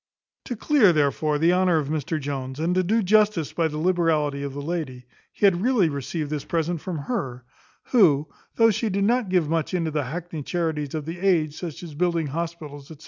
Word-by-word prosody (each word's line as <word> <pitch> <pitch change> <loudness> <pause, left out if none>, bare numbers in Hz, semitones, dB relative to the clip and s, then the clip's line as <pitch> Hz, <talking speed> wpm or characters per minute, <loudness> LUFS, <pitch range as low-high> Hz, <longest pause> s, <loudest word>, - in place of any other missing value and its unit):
To 245 - -4
clear, 230 - +4
therefore, 150 0 +1
the 165 +4 +3
honour 180 -2 +3
of 145 -3 -2
Mr 155 +1 -2
Jones, 135 -1 -5
and 165 +3 0
to 185 - +3
do 215 +5 +1
justice 210 -5 +3
to 165 -2 +1
the 150 - -5
liberality 155 -4 +1
of 140 -1 -4
the 145 - -4
lady, 145 -6 -4 0.3
he - - 0
had 180 -3 +4
really 225 -7 +3
received 145 +2 -4
this 150 -2 -2
present 165 0 -2
from 180 -3 -4
her, 130 - -4 0.5
who, 160 - +4 0.3
though 225 -1 +5
she 225 +2 -1
did 200 0 0
not 235 0 +1
give 180 -4 +2
much 165 +3 -1
into 165 -3 -1
the 150 -2 -1
hackney 165 +3 -5
charities 160 -2 -2
of 155 -2 -4
the 165 +2 -6
age, 165 -6 +2
such 170 -1 -7
as 165 -3 -8
building 170 +1 0
hospitals, 150 -2 -5
&c. 160 - -10
165 Hz, 205 wpm, -24 LUFS, 150-185 Hz, 0.5 s, though